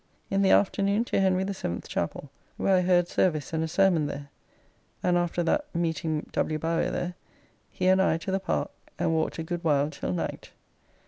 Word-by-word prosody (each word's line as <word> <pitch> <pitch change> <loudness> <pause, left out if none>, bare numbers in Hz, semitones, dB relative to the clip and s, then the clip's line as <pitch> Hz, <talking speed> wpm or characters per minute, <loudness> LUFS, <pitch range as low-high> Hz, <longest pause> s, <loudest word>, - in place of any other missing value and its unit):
In 195 0 +2
the 195 - +4
afternoon 200 +3 +3
to - - 0
Henry 190 -1 +2
the 200 +1 -2
Seventh's 85 - -4
Chappell, 135 +11 -3 0.3
where 195 - +3
I - - +3
heard 175 -1 +3
service 155 -5 0
and 160 0 0
a - - -1
sermon 170 -3 +3
there, 140 0 -6 0.7
and 180 -1 +3
after 175 0 0
that 295 - +1
meeting 160 -2 -1
W. 155 - 0
Bowyer 165 +2 0
there, 180 0 -3 0.6
he - - -3
and 190 +1 +5
I 165 - +3
to 180 +3 -5
the 190 - +1
Park, 75 - -2 0.3
and 165 - +1
walked 160 0 0
a 165 - -3
good 175 +1 -4
while 145 -2 +2
till 140 - -4
night. 90 - -4
170 Hz, 195 wpm, -27 LUFS, 155-190 Hz, 0.7 s, and